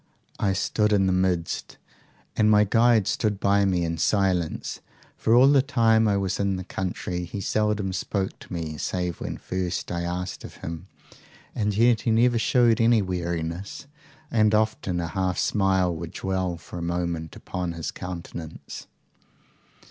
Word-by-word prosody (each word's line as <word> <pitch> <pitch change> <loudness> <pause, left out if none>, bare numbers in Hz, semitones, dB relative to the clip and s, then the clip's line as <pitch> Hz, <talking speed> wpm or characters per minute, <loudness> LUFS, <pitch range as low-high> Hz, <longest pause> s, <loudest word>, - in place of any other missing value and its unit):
"'I 100 -2 +1
stood 105 +3 +1
in 100 -2 +3
the 95 - +2
midst, 90 -2 -1 0.6
and 105 0 +3
my 105 -1 +6
guide 115 0 +4
stood 105 -2 0
by 100 0 +3
me 90 -3 +1
in 85 -1 -3
silence; 90 -4 0 0.4
for 115 - +2
all 125 +2 +7
the 140 -1 +6
time 115 -5 +3
I 100 -1 +2
was 95 -2 -1
in 100 -1 +1
the 95 - -4
country, 90 -1 -4
he 90 +4 -6
seldom 105 -1 0
spoke 95 +1 -2
to - - -15
me 80 -4 -4
save 90 -2 -2
when - - -4
first 90 -1 -3
I 85 -1 -2
asked 90 +1 -4
of - - -10
him, 80 -1 -6 0.7
and 105 -2 -1
yet 115 0 +4
he - - -1
never 115 +1 +3
showed 120 -1 +3
any 115 -2 +4
weariness, 85 +4 -4 0.5
and 110 -1 +3
often 105 -4 0
a 85 - -2
half 95 0 -1
smile 95 -3 +2
would 80 0 -7
dwell 95 -2 -2
for 85 - -9
a - - -5
moment 85 -2 -3
upon 90 -2 -4
his 85 -2 -4
countenance. 85 -3 -8
95 Hz, 165 wpm, -25 LUFS, 85-105 Hz, 0.7 s, all